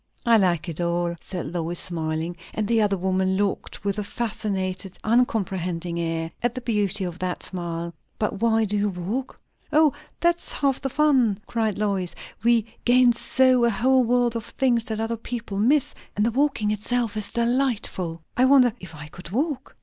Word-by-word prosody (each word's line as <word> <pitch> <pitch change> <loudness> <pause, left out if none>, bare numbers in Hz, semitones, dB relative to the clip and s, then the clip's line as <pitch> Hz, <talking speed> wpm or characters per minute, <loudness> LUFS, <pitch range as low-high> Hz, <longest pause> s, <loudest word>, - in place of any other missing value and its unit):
"I 235 -1 +6
like 180 -4 +1
it 165 0 -2
all," 170 0 0
said 175 -4 -5
Lois, 170 0 -2
smiling. 165 0 -2 0.2
And 215 -1 -1
the 225 0 +3
other 200 -2 +2
woman 190 +1 +1
looked, 200 -1 -2
with 200 +1 0
a - - -1
fascinated, 200 -4 -3
uncomprehending 185 -7 0
air, 165 -1 -2
at 240 +1 0
the 255 - -4
beauty 205 -4 0
of 175 -1 -5
that 180 -1 -3
smile. 170 -2 -4 0.2
"But 210 -1 -2
why 225 -1 +3
do 210 0 -2
you 205 0 +1
walk?" 200 +9 -4 0.3
"O, 305 -1 +5 0.3
that's 345 0 +1
half 275 -2 0
the 270 - -2
fun," 265 -8 +3
cried 220 -3 -1
Lois. 195 -4 -1 0.3
"We 235 -2 +4 0.2
gain 245 0 +5
so 255 +1 +3
a 235 - +5
whole 255 +5 +3
world 240 0 +2
of 230 - -3
things 240 -4 +1
that 220 -3 -3
other 225 +1 -1
people 225 -3 -5
miss. 265 +6 +3 0.2
And 210 - +2
the 235 - +2
walking 265 -5 +1
itself 225 +2 -1
is 215 -1 -3
delightful." 235 -9 -1
"I 255 - +4
wonder 260 -3 +6
if 180 -3 -10
I 150 -1 -8
could 170 +2 -10
walk?" 275 - -2
210 Hz, 180 wpm, -24 LUFS, 180-240 Hz, 0.3 s, I